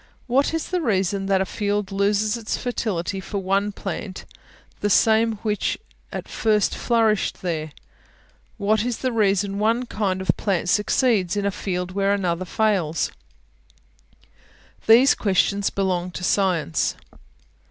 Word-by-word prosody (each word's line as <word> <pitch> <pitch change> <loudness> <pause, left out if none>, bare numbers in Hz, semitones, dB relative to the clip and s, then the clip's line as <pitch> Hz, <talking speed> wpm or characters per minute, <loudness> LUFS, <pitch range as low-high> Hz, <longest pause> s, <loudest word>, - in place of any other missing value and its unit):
What 265 +3 +2
is 325 -1 -3
the 365 -1 0
reason 195 - 0
that 195 -1 +2
a - - +1
field 205 0 -2
loses 205 +2 +1
its 225 -2 -3
fertility 200 -6 -2
for 195 +2 -5
one 195 +2 0
plant, 195 -1 -6 0.5
the 205 - 0
same 225 +2 +4
which 210 -2 -1 0.3
at - - -6
first 215 -2 +1
flourished 220 -4 +1
there? 155 -3 -2 0.9
What 215 +1 +1
is 245 -1 -2
the 255 - -1
reason 200 -2 +1
one 230 +4 +1
kind 200 -5 -1
of 190 - +2
plant 185 -4 -1
succeeds 210 -1 +2
in 200 - -1
a 200 - +1
field 180 -2 -3
where 195 +1 +1
another 185 -2 -1
fails? 185 -6 0 1.8
These 240 +5 +7
questions 200 0 +1
belong 185 -2 -1
to 180 - -6
Science. 180 - +1
200 Hz, 135 wpm, -23 LUFS, 190-220 Hz, 1.8 s, These